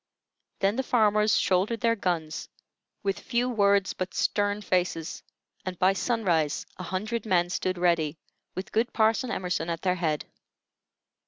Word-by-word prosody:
Then 200 Hz, +3 st, +2 dB
the -, -, +2 dB
farmers 215 Hz, -4 st, +3 dB
shouldered 195 Hz, +5 st, +1 dB
their 230 Hz, 0 st, +3 dB
guns, 170 Hz, -6 st, -2 dB, 0.5 s
with 195 Hz, -1 st, -1 dB
few 245 Hz, 0 st, 0 dB
words 200 Hz, -5 st, +3 dB
but 185 Hz, 0 st, -5 dB
stern 205 Hz, 0 st, 0 dB
faces, 180 Hz, -4 st, -1 dB, 0.4 s
and 185 Hz, -1 st, -5 dB
by 185 Hz, +2 st, +4 dB
sunrise 185 Hz, -, 0 dB
a 185 Hz, -, -6 dB
hundred 215 Hz, +5 st, -2 dB
men 175 Hz, -4 st, +2 dB
stood 185 Hz, 0 st, -1 dB
ready, 170 Hz, -3 st, +1 dB, 0.4 s
with 185 Hz, -, -5 dB
good 230 Hz, +3 st, +1 dB
Parson 225 Hz, +3 st, +2 dB
Emerson 180 Hz, -6 st, -2 dB
at 165 Hz, -1 st, -3 dB
their 180 Hz, -1 st, +3 dB
head. 160 Hz, -4 st, -1 dB
190 Hz, 145 wpm, -27 LUFS, 175-215 Hz, 0.5 s, by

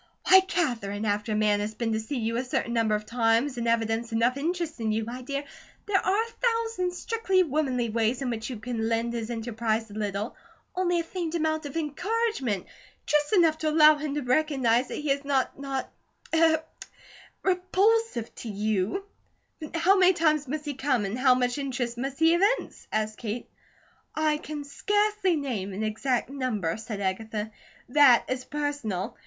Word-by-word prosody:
Why, 380 Hz, -, +9 dB
Katherine, 240 Hz, -, -1 dB
after 210 Hz, +1 st, 0 dB
a -, -, 0 dB
man 210 Hz, -1 st, +2 dB
has 210 Hz, +1 st, -3 dB
been 225 Hz, 0 st, -1 dB
to 220 Hz, -, 0 dB
see 240 Hz, +6 st, -4 dB
you 230 Hz, -1 st, -1 dB
a 250 Hz, -, 0 dB
certain 245 Hz, -2 st, -2 dB
number 225 Hz, -2 st, +2 dB
of 210 Hz, 0 st, -4 dB
times, 235 Hz, +3 st, +1 dB
and 235 Hz, -, -2 dB
evidenced 230 Hz, 0 st, 0 dB
enough 230 Hz, +3 st, +2 dB
interest 325 Hz, +1 st, -2 dB
in 220 Hz, -1 st, 0 dB
you, 220 Hz, +1 st, -1 dB
my 245 Hz, +3 st, -6 dB
dear, 280 Hz, +2 st, -3 dB, 0.4 s
there 405 Hz, -2 st, +1 dB
are 395 Hz, +4 st, +2 dB
a 460 Hz, -, -10 dB, 0.4 s
thousand 365 Hz, -5 st, -1 dB
strictly 385 Hz, -2 st, +1 dB
womanly 270 Hz, -6 st, 0 dB
ways 230 Hz, +2 st, +1 dB
in 250 Hz, -, -1 dB
which 225 Hz, +1 st, -4 dB
you 250 Hz, -, -5 dB
can 225 Hz, 0 st, -3 dB
lend 230 Hz, +1 st, 0 dB
his 230 Hz, -1 st, -4 dB
enterprise 225 Hz, -1 st, -2 dB
a -, -, -9 dB
little, 205 Hz, +1 st, -3 dB, 0.4 s
only 355 Hz, -1 st, +1 dB
a -, -, -1 dB
faint 340 Hz, -1 st, -4 dB
amount 315 Hz, -2 st, 0 dB
of 285 Hz, -, -6 dB
encouragement, 320 Hz, -, -1 dB, 0.4 s
just 295 Hz, 0 st, +1 dB
enough 330 Hz, -5 st, +4 dB
to 310 Hz, -, 0 dB
allow 305 Hz, 0 st, +7 dB
him 295 Hz, -1 st, -4 dB
to 295 Hz, -, -1 dB
recognize 255 Hz, -3 st, +2 dB
that -, -, -5 dB
he 295 Hz, -1 st, -1 dB
is 280 Hz, +1 st, 0 dB
not 275 Hz, -1 st, 0 dB
not 275 Hz, -1 st, -3 dB, 0.5 s
er 320 Hz, -1 st, +4 dB, 0.8 s
repulsive 375 Hz, -, +1 dB
to 230 Hz, -, -8 dB
you." 210 Hz, -, -1 dB, 0.6 s
"But 310 Hz, 0 st, -7 dB
how 350 Hz, +4 st, +4 dB
many 370 Hz, 0 st, +6 dB
times 310 Hz, -4 st, +2 dB
must 300 Hz, +3 st, -4 dB
he 290 Hz, -, -2 dB
come, 260 Hz, -5 st, 0 dB
and 205 Hz, +6 st, -3 dB
how 255 Hz, -1 st, +5 dB
much 250 Hz, +1 st, 0 dB
interest 245 Hz, -3 st, -3 dB
must 270 Hz, +1 st, -3 dB
he 325 Hz, +1 st, +5 dB
evince?" 400 Hz, +8 st, 0 dB
asked 215 Hz, 0 st, -1 dB
Kate. 230 Hz, +1 st, -5 dB, 0.6 s
"I 310 Hz, -1 st, +2 dB
can 300 Hz, -1 st, -6 dB
scarcely 415 Hz, +5 st, +1 dB
name 235 Hz, -10 st, -3 dB
an 205 Hz, +3 st, -3 dB
exact 235 Hz, +4 st, 0 dB
number," 230 Hz, -12 st, -1 dB
said 220 Hz, -2 st, -6 dB
Agatha. 210 Hz, +3 st, -3 dB, 0.4 s
"That 260 Hz, -3 st, +6 dB
is 255 Hz, 0 st, -2 dB
personal. 285 Hz, -10 st, -3 dB
260 Hz, 180 wpm, -27 LUFS, 225-315 Hz, 0.8 s, Why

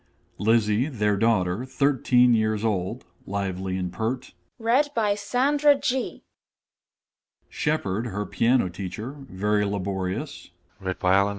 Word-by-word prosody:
_ -, -, -39 dB, 0.4 s
LIZZIE, 110 Hz, +2 st, +3 dB
their 105 Hz, -7 st, 0 dB
daughter, 100 Hz, -1 st, +1 dB
13, 130 Hz, -2 st, +3 dB
years 110 Hz, -1 st, +1 dB
old 95 Hz, -4 st, -2 dB, 0.2 s
(lively 95 Hz, -1 st, -2 dB
and 90 Hz, -1 st, -3 dB
pert). 115 Hz, +3 st, -3 dB, 0.3 s
SHEPARD, 255 Hz, +3 st, +1 dB, 1.8 s
_her 105 Hz, -2 st, -4 dB
piano 120 Hz, -3 st, +3 dB
teacher 95 Hz, +6 st, -6 dB, 0.2 s
(very 105 Hz, +2 st, +1 dB
laborious). 100 Hz, +6 st, -3 dB
110 Hz, 85 wpm, -25 LUFS, 100-140 Hz, 1.8 s, LIZZIE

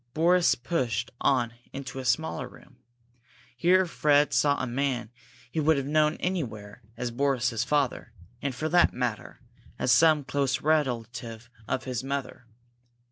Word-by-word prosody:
Boris 175 Hz, +2 st, +4 dB
pushed 120 Hz, -5 st, -2 dB
on 120 Hz, -3 st, +2 dB, 0.2 s
into 135 Hz, -1 st, -6 dB
a 130 Hz, -, -6 dB
smaller 140 Hz, +6 st, 0 dB
room. -, -, -18 dB, 0.8 s
Here 185 Hz, +8 st, +4 dB
Fred 150 Hz, -3 st, +2 dB
saw 145 Hz, -1 st, +3 dB
a -, -, -1 dB
man 125 Hz, -2 st, -2 dB, 0.4 s
he 160 Hz, -, -2 dB
would 155 Hz, 0 st, +3 dB
have 140 Hz, -, -2 dB
known 150 Hz, +1 st, +2 dB
anywhere 120 Hz, -, -4 dB, 0.2 s
as 125 Hz, -1 st, -3 dB
Boris's 125 Hz, -3 st, 0 dB
father, 135 Hz, -4 st, -1 dB, 0.3 s
and, 140 Hz, -3 st, -3 dB
for 155 Hz, -, -2 dB
that 175 Hz, +2 st, +4 dB
matter, 125 Hz, -4 st, -4 dB, 0.4 s
as 125 Hz, -, +1 dB
some 155 Hz, +3 st, +5 dB
close 140 Hz, 0 st, -1 dB
relative 120 Hz, -6 st, -2 dB, 0.2 s
of 130 Hz, -, -2 dB
his 130 Hz, -2 st, -4 dB
mother. 135 Hz, -2 st, -5 dB
135 Hz, 140 wpm, -27 LUFS, 120-150 Hz, 0.8 s, some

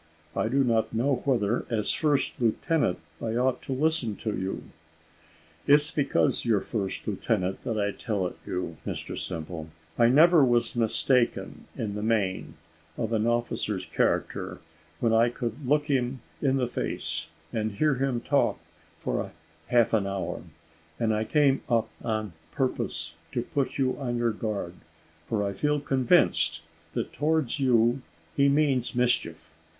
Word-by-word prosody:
I -, -, +1 dB
do 135 Hz, +4 st, +2 dB
not 115 Hz, -2 st, +1 dB
know 130 Hz, +3 st, +1 dB
whether, 120 Hz, -4 st, +1 dB
as 110 Hz, -3 st, +1 dB
first 145 Hz, -4 st, 0 dB
lieutenant, 120 Hz, -, +1 dB, 0.2 s
I 115 Hz, 0 st, -2 dB
ought 125 Hz, +1 st, +1 dB
to -, -, -7 dB
listen 135 Hz, -5 st, +1 dB
to 110 Hz, 0 st, -3 dB
you." 95 Hz, +1 st, -3 dB, 1.0 s
"It's 150 Hz, +2 st, +5 dB
because 145 Hz, -3 st, +1 dB
you're 115 Hz, -4 st, +3 dB
first 100 Hz, -3 st, -4 dB
lieutenant 95 Hz, +1 st, -1 dB
that 115 Hz, -, -2 dB
I 100 Hz, 0 st, +1 dB
tell 100 Hz, -3 st, -2 dB
it 90 Hz, -, -4 dB
you, 90 Hz, -3 st, -4 dB
Mr -, -, -5 dB
Simple. 80 Hz, -2 st, -5 dB, 0.3 s
I 115 Hz, -, +7 dB
never 155 Hz, +5 st, +6 dB
was 120 Hz, -2 st, +2 dB
mistaken, 120 Hz, +2 st, +1 dB
in 105 Hz, -3 st, -3 dB
the 105 Hz, -, -4 dB
main, 100 Hz, -7 st, 0 dB, 0.4 s
of 115 Hz, -1 st, -2 dB
an 110 Hz, 0 st, +1 dB
officer's 115 Hz, -5 st, -1 dB
character, 80 Hz, -, -1 dB, 0.4 s
when 115 Hz, -2 st, +2 dB
I 115 Hz, +1 st, +5 dB
could 120 Hz, +2 st, -5 dB
look 150 Hz, +2 st, +3 dB
him 130 Hz, -3 st, 0 dB, 0.2 s
in 135 Hz, -2 st, +2 dB
the 125 Hz, -2 st, +1 dB
face, 120 Hz, -, -2 dB, 0.3 s
and 110 Hz, -1 st, -1 dB
hear 150 Hz, +8 st, +2 dB
him 130 Hz, -2 st, -1 dB
talk -, -, +2 dB, 0.4 s
for -, -, -2 dB, 0.4 s
half 120 Hz, -2 st, +3 dB
an 105 Hz, -3 st, +2 dB
hour; 95 Hz, -1 st, -3 dB, 0.6 s
and 110 Hz, -1 st, +2 dB
I 110 Hz, +1 st, 0 dB
came 140 Hz, 0 st, +3 dB
up 115 Hz, -2 st, +2 dB
on 110 Hz, -4 st, -2 dB, 0.2 s
purpose 95 Hz, -11 st, -1 dB, 0.2 s
to 120 Hz, -3 st, 0 dB
put 140 Hz, +1 st, -2 dB
you 130 Hz, -2 st, +1 dB
on 120 Hz, -3 st, -2 dB
your 120 Hz, -1 st, +1 dB
guard: 105 Hz, -5 st, -3 dB, 0.5 s
for 105 Hz, -3 st, 0 dB
I 100 Hz, 0 st, -1 dB
feel 150 Hz, +9 st, +1 dB
convinced, 135 Hz, -4 st, +2 dB, 0.3 s
that -, -, -3 dB
towards 155 Hz, -3 st, 0 dB
you 120 Hz, -1 st, +3 dB, 0.3 s
he 140 Hz, 0 st, +4 dB
means 140 Hz, -5 st, +2 dB
mischief. 125 Hz, 0 st, 0 dB
120 Hz, 150 wpm, -27 LUFS, 110-135 Hz, 1.0 s, I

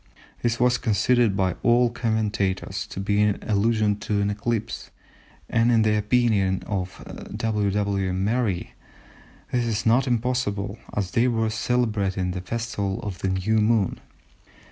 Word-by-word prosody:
This 120 Hz, -1 st, 0 dB
was 125 Hz, 0 st, +3 dB
considered 115 Hz, -2 st, +2 dB
by 95 Hz, -2 st, +1 dB
old 120 Hz, 0 st, +4 dB
commentators 110 Hz, -5 st, -1 dB
to -, -, -7 dB
be 100 Hz, +1 st, +1 dB
an 105 Hz, -1 st, +2 dB
allusion 105 Hz, 0 st, +1 dB
to 105 Hz, -1 st, -1 dB
an 100 Hz, 0 st, +1 dB
eclipse, 110 Hz, +2 st, -3 dB, 0.6 s
and 115 Hz, +1 st, +2 dB
in 115 Hz, -2 st, +4 dB
the 110 Hz, -1 st, +2 dB
opinion 105 Hz, -3 st, +2 dB
of 95 Hz, -2 st, -4 dB, 0.3 s
W. 105 Hz, -3 st, 0 dB
W. 100 Hz, -1 st, 0 dB
Merry 100 Hz, +1 st, -1 dB, 0.8 s
"this 120 Hz, -1 st, +1 dB
is 110 Hz, -1 st, -1 dB
not 120 Hz, +4 st, +3 dB
impossible, 115 Hz, -4 st, -1 dB, 0.2 s
as 95 Hz, -3 st, -1 dB
they 120 Hz, +5 st, +3 dB
were 115 Hz, -2 st, 0 dB
celebrating 105 Hz, -6 st, 0 dB
the 90 Hz, 0 st, -4 dB
Festival 100 Hz, -1 st, -3 dB
of 100 Hz, -4 st, -5 dB
the 95 Hz, -, -1 dB
New 95 Hz, +4 st, +1 dB
Moon." 105 Hz, -3 st, +2 dB
105 Hz, 145 wpm, -24 LUFS, 100-115 Hz, 0.8 s, old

